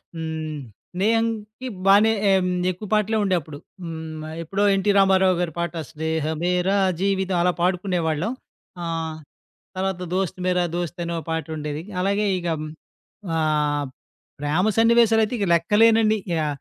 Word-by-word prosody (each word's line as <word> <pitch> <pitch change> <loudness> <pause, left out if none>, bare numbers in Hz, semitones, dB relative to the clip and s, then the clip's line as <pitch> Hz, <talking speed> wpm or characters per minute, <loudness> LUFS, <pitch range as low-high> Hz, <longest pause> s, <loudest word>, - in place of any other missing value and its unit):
హ్మ్. 160 -1 -4 0.4
స్నేహంకి 225 +3 -1 0.2
బానే 205 +3 +6 0.2
ఆహ్, 190 -1 +4
హ్మ్. 180 - 0 0.2
ఎక్కువ 190 +4 -8
పాటలే 215 +1 +2
ఉండేప్పుడు. 170 -6 -1 0.3
హ్మ్ 160 -2 -6 0.2
ఎప్పుడో 195 +5 -1
ఎన్టీ 195 +1 +2
రామారావు 190 -1 +4
గారి 175 -2 -2
పాట. 170 -1 -2 0.2
'స్నేహమేర 160 +3 -1 0.3
జీవితం' 190 -2 +1
అలా 180 +1 +2
పాడుకునేవాళ్ళం. 180 0 0 0.5
ఆ! 170 - -3 0.9
తర్వాత 190 -1 -2
'దోస్త్ 190 -1 -1
మర 180 0 +2 0.2
దోస్త్' 175 0 -3
అనో 170 0 -3
పాటుండేది. 155 -2 -3 0.2
అలాగే 200 +2 +1
ఇక 175 - -6
హ్మ్. 155 0 -5 0.7
ఆహ్, 150 -2 +1 0.5
ప్రేమ 155 +8 +1
సన్నివేశాలు 225 -1 +5
అయితే 220 - -4
ఇక 200 - +1
లెక్కలేనన్నీ. 220 +4 +4 0.3
ఆ! - - 0
180 Hz, 125 wpm, -23 LUFS, 160-205 Hz, 0.9 s, బానే